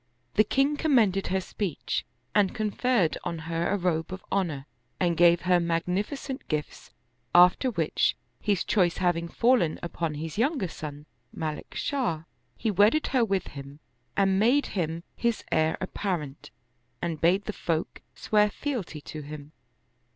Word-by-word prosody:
The 215 - +5
king 275 +6 +1
commended 225 - +3
her 190 - +1
speech, 185 -2 -3 0.3
and 200 -2 +3
conferred 215 -4 +1
on 170 - -3
her 165 +1 -2
a 205 - +1
robe 175 -2 -1
of 185 0 -7
honor 160 -8 -1 0.3
and 175 -2 +2
gave 170 0 +5
her 180 -1 +3
magnificent 180 - -2
gifts; 150 -1 -4 0.5
after 180 +9 +6
which, 170 -9 +1 0.2
his 200 -4 +1
choice 180 -5 +2
having 175 -2 +1
fallen 230 -5 +2
upon 165 -2 -3
his 160 +5 -5
younger 260 - +1
son, 150 -2 -7 0.3
Malik 155 -1 -5
Shah, 240 - -1 0.3
he 225 - 0
wedded 210 - +4
her 255 -3 +4
with 195 -4 -1
him 140 +1 -10 0.4
and 195 -1 +3
made 250 +7 +4
him 165 -3 -2
his 235 -1 0
heir 160 0 +2
apparent 175 -7 -4 0.5
and 165 -3 -3
bade 185 +4 +3
the 215 - -3
folk 165 -4 -2
swear 210 -1 +3
fealty 210 - -4
to 155 +1 -7
him. 150 0 -9
180 Hz, 145 wpm, -27 LUFS, 160-210 Hz, 0.5 s, after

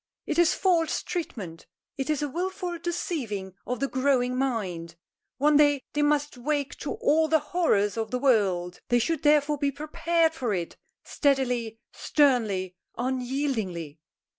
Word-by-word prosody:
It 320 - -1
is 345 -2 +4
false 340 -4 +1
treatment. 210 - -5 0.3
It 270 +1 -3
is 300 -1 0
a - - 0
wilful 355 +3 -3
deceiving 240 - -3
of 250 0 -2
the 275 - 0
growing 260 -2 +1
mind. 190 -11 -2 0.4
One 295 +2 +4
day 290 -2 +4
they 295 - 0
must 295 -2 +1
wake 285 +1 -1
to 295 - -4
all 315 +2 +2
the 315 - +4 0.2
horrors 210 - +2
of 220 -1 -2
the 250 - -1
world. 195 -9 +1
They 240 - +4
should 290 +6 0
therefore 295 -1 +3
be 280 0 +1
prepared 320 +3 0
for 245 -10 -1
it, 170 -2 -4 0.3
steadily, 250 -6 0 0.2
sternly, 220 - +1 0.2
unyieldingly!" 245 - -2
270 Hz, 145 wpm, -27 LUFS, 225-300 Hz, 0.4 s, is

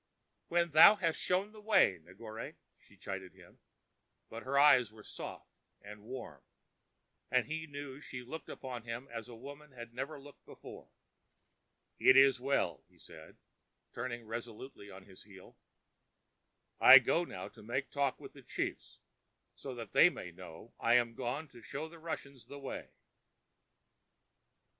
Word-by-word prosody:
"When 170 -1 +1
thou 160 +7 +9
hast 165 -6 -1
shown 190 +3 0
the 215 -1 -13
way, 210 - +4
Negore," 110 +7 -9 0.2
she - - -23
chided 95 -2 -7
him; - - -18 0.7
but 115 - -7
her 135 +3 -2
eyes 140 -6 +6
were 110 -1 -15
soft, - - -9 0.3
and 105 +1 -11
warm, 115 - -8 0.9
and 125 -2 +2
he 160 +1 -5
knew 145 -1 -8
she 125 -3 -8
looked 150 +5 -8
upon 125 -3 -6
him 115 +3 -6
as 115 0 -7
woman 140 +5 -11
had 120 -1 -10
never 140 +4 -5
looked 145 0 -15
before. - - -12 1.1
"It 130 - +7
is 135 -1 +6
well," 125 - 0
he - - -26
said, 80 -1 -14 0.6
turning 120 -1 -5
resolutely 115 -1 -8
on 95 0 -11
his 95 -1 -13
heel. 95 -2 -15 1.2
"I 135 - +11
go 135 +7 +3
now 95 - -7
to 105 - -16
make 125 +5 -3
talk 140 -2 0
with - - -11
the - - -13
chiefs, - - -5 0.6
so 135 -2 -8
that 115 -1 -8
they 175 - +8
may 90 - -8
know 85 +4 -12
I 115 +1 +3
am 120 -1 +3
gone 130 +6 -4
to 120 -3 -15
show 145 +8 -6
the 165 +1 -14
Russians 140 -5 -7
the 140 - -9
way." 135 -1 -7
125 Hz, 150 wpm, -33 LUFS, 110-145 Hz, 1.2 s, I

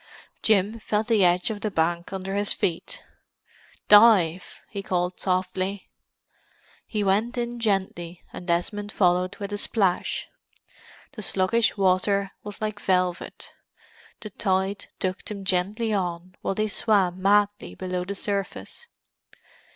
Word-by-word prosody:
Jim 215 +1 +2
felt 215 0 -1
the 215 -3 +3
edge 180 +4 +3
of 205 -1 -6
the 215 - -1
bank 170 -1 0
under 195 0 -4
his 205 0 +1
feet. - - -3 0.8
"Dive!" 205 -5 +5
he 200 - -5
called 180 -1 -1
softly. 185 +1 -2 1.0
He 210 -2 -1
went 210 +6 +1
in 240 0 -3
gently 190 -5 -2
and 180 - -8
Desmond 205 +4 -1
followed 180 0 +2
with 200 0 -5
a 205 - -2
splash. 195 -6 0 0.8
The 215 - -8
sluggish 210 +4 +1
water 195 +1 +2
was 205 0 -8
like 215 -1 -3
velvet; 180 -2 -1 0.7
the 215 - -7
tide 190 +1 -1
took 185 0 -2
them 200 -2 -6
gently 200 +5 +1
on, 180 -2 -2
while 195 - -1
they 215 +1 +1
swam 195 -4 +1
madly 205 +1 +2
below 180 -1 -3
the 200 +2 -5
surface. 200 - -4
195 Hz, 130 wpm, -25 LUFS, 185-210 Hz, 1.0 s, Dive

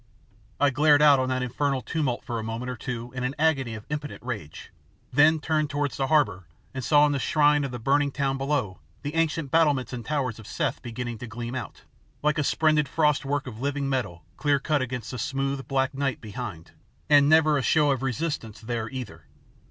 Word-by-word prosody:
I 145 0 +4
glared 145 +1 +5
out 145 -2 +7
on 130 0 0
that 130 0 0
infernal 135 +1 -1
tumult 145 -7 -2
for 120 -3 -3
a - - -4
moment 115 +3 -4
or - - -5
two 120 0 -5
in 125 -1 -4
an 130 +3 -2
agony 135 -7 +1
of 110 - -9
impotent 150 -3 -5
rage, 100 -10 -6 0.4
then 155 +2 +5
turned 155 -1 0
towards 145 -1 -1
the 135 - -1
harbour 100 - +2 0.3
and 130 -1 -4
saw 145 +2 +5
in 145 - +2
the 140 - 0
shine 150 0 +3
of 140 - -2
the 125 - -5
burning 140 +4 +2
town 135 -1 -1
below 135 -9 -1 0.2
the 145 +1 -4
ancient 165 -3 0
battlements 145 -6 +2
and 120 -1 -5
towers 130 -4 -2
of 110 - -12
Seth - - -2
begin 120 -1 -5
to 125 - -7
gleam 120 +1 -6
out, 130 - -6 0.4
like 150 0 +2
a - - +2
splendid 155 0 +2
frost 150 -3 +2
work 145 +1 -1
of 115 -4 -8
living 140 0 -1
metal 105 - -3
clear 145 -1 +2
cut 145 +1 0
against 125 -3 -4
the 125 - -5
smooth, 135 +3 -2
black 135 0 0
night 135 -3 -1
behind, 105 -7 -7 0.4
and 145 -1 +6
never 155 -1 +5
a 140 - +1
show 150 +1 +3
of 130 -2 -1
resistance 135 -4 -3
there 115 0 -3
either. 110 -12 -7
135 Hz, 205 wpm, -26 LUFS, 120-145 Hz, 0.4 s, out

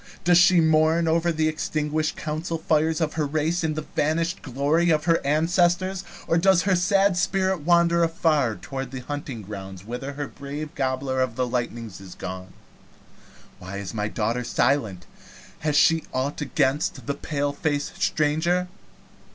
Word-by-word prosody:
Does 175 0 +5
she 180 0 +6
mourn 160 +1 +3
over 165 +1 +2
the 155 -1 +1
extinguished 155 0 -1
council 160 +2 -3
fires 160 0 +1
of 155 -1 0
her 155 -2 0
race, 155 +4 0
and 155 -1 0
the 155 -1 -4
vanished 165 +4 0
glory 145 +7 +1
of 155 -2 +2
her 165 -1 +2
ancestors? 175 +5 +1 0.2
Or 165 - +2
does 190 0 +4
her 195 -2 +2
sad 195 +2 +3
spirit 190 0 +1
wander 170 +2 +3
afar 155 -8 +1
toward 135 +1 -6
the 130 0 -6
hunting 140 -5 -6
grounds 95 -2 -8
whither 125 +5 -5
her 145 0 -4
brave 145 +4 -7
Gobbler 130 -1 -1
of 130 -3 -1
the 125 - 0
Lightnings 120 -4 -4
is 95 -2 -11
gone? 95 0 -7 1.1
Why 95 +2 -7
is 100 0 -6
my 105 -2 -1
daughter 115 +3 -1
silent? 120 -7 0 0.5
Has 150 -1 -1
she 160 +1 +4
ought 135 +4 -2
against 135 -2 0
the 140 - -1
paleface 145 +1 -2
stranger?" 160 +4 +1
150 Hz, 155 wpm, -24 LUFS, 130-165 Hz, 1.1 s, she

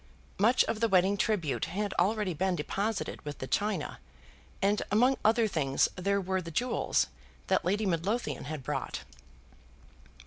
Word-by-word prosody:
Much 235 +6 +5
of 215 - -2
the 230 - +3
wedding 190 0 +4
tribute 195 - 0
had 200 +3 -2
already 200 0 +1
been 185 +3 0
deposited 200 +7 -2
with 145 -1 -6
the - - -5
china, 200 +2 -1 0.6
and 205 +2 +2
among 245 +6 +4
other 225 +1 +4
things 140 -8 +2
there 200 +2 +1
were 190 0 -1
the 165 - -7
jewels 245 +10 +1 0.4
that - - +2
Lady 205 +5 +1
Midlothian 195 +7 -1
had 150 -2 -5
brought. - - -3
195 Hz, 145 wpm, -30 LUFS, 175-215 Hz, 0.6 s, Much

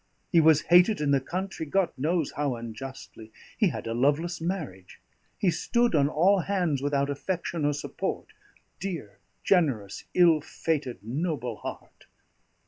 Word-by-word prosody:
He 170 - +6
was 155 -1 +5
hated 180 +5 +5
in 150 -1 +1
the 140 -1 +3
country, 185 +5 -4
God 180 +4 +1
knows 155 +3 0
how 145 -3 -1
unjustly. 115 -1 -9 0.2
He 215 - +3
had - - -6
a 115 - -2
loveless 150 +8 +1
marriage. 155 - -5 0.4
He 185 - +2
stood 240 +5 +1
on 145 -2 +3
all 185 +6 +3
hands 175 -7 0
without 140 0 0
affection 170 +1 -3
or 145 - +2
support 145 - -4 0.5
dear, 160 - -6 0.2
generous, 135 - +1
ill 170 -4 +5
fated, 145 - -3
noble 125 -2 -3
heart!" - - -9
150 Hz, 140 wpm, -27 LUFS, 135-175 Hz, 0.5 s, He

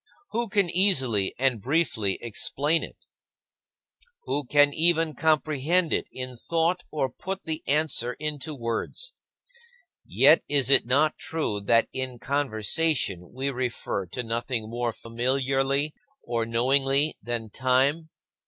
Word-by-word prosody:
Who 235 -1 -2
can 200 -2 +2
easily 135 - +3
and 125 -4 +1
briefly 130 - 0
explain 145 +7 -1
it? - - -11 1.2
Who 145 - -2
can 145 +2 +4
even 165 -1 +3
comprehend 155 +2 +1
it - - 0
in 130 -1 -6
thought 170 +2 +1
or 150 -3 0
put 190 +10 -6
the 160 -2 -4
answer 140 -4 +1
into 150 +1 -4
words? 120 - -4 0.9
Yet - - +4
is 140 -3 +4
it 135 - +6
not 145 +5 +2
true 145 -10 -2
that 115 +2 +3
in 130 -2 -3
conversation 130 - -1
we 135 +2 -3
refer 120 -6 -3
to 125 +9 -5
nothing 115 -1 -3
more 120 0 -1
familiarly 135 +5 -1 0.3
or 115 -1 -2
knowingly 135 +5 +2
than 115 -2 -4
time? 135 +6 +1
135 Hz, 125 wpm, -26 LUFS, 120-155 Hz, 1.2 s, it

